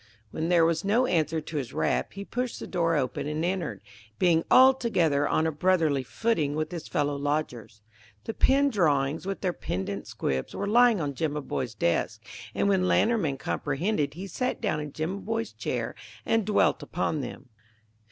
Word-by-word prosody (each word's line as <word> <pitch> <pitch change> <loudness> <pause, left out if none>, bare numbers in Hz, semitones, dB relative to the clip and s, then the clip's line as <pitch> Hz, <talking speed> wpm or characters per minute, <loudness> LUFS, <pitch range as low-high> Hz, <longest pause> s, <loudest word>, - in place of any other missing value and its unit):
When 160 +2 -2
there 170 -2 +5
was 165 -1 +1
no 220 +6 +3
answer 160 -6 +1
to 155 +1 -6
his 130 -5 -4
rap - - 0
he 200 +1 -7
pushed 250 +2 -3
the - - -6
door 165 -2 0
open 135 -1 -1
and 155 +2 -1
entered, 180 -3 -2 0.4
being 165 -2 +3
altogether 230 - +4
on 160 - +1
a 160 - +1
brotherly 160 -3 +2
footing 150 - -1
with 155 0 -2
his 170 -3 -6
fellow 145 0 0
lodgers. 140 -6 -3 0.4
The 225 - -4
pen 280 +4 +3
drawings 155 - +1
with 195 - -3
their 180 -3 0
pendant 100 - -4
squibs 65 -1 -3
were 200 - -2
lying 235 0 +5
on 145 -3 -2
Jimaboy's 140 -5 -3
desk; 85 -5 0 0.4
and - - +1
when 190 -2 +2
Lantermann 200 -14 +2
comprehended 150 +2 -1
he 185 +3 -6
sat 250 +7 -2
down 195 -9 -1
in 150 -1 -5
Jimaboy's 200 +9 -3
chair - - -3 0.3
and 225 -2 +1
dwelt 210 - +2
upon 160 -4 -2
them. 125 +1 -8
165 Hz, 170 wpm, -27 LUFS, 145-200 Hz, 0.4 s, there